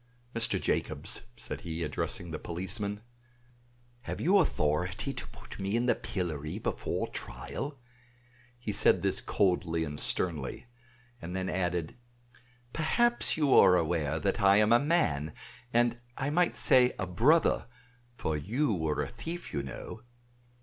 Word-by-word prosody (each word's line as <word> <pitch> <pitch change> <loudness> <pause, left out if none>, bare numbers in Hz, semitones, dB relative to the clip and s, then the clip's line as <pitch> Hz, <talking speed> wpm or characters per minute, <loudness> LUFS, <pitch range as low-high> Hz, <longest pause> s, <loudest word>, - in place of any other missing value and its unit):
"Mr. 115 - +3
Jacobs," - - -2
said - - -5
he, 85 0 -4
addressing 80 +2 -3
the 80 - -4
policeman, 100 +4 -2 1.0
"have - - -5
you 195 +4 +4
authority 90 - 0
to 125 - -5
put - - -12
me 100 +2 -1
in 120 +1 +1
the 125 - +4
pillory 85 -3 -4
before 110 - -2
trial?" 100 - -6 0.8
He 120 -3 -4
said 100 - +4
this - - +1
coldly 90 -4 +1
and 75 -2 -5
sternly; 80 - -1 0.6
and 90 +2 -6
then 95 -1 -2
added, 90 -2 -2 0.8
"Perhaps 240 +10 +2
you 145 -4 +3
are 95 -2 +7
aware 80 -3 0
that 100 +4 -1
I 100 0 +6
am 105 +1 +4
a 120 - +6
man, 85 - +1 0.4
and 120 0 +2 0.2
I 140 +1 -1
might 175 +3 +2
say 125 -1 +5
a 95 - -2
brother, 125 - +3 0.5
for 80 -9 -2
you 110 - 0
were 80 -4 -1
a - - -4
thief, 165 +9 -7
you 70 - -1
know!" 70 - -8
95 Hz, 145 wpm, -30 LUFS, 80-120 Hz, 1.0 s, are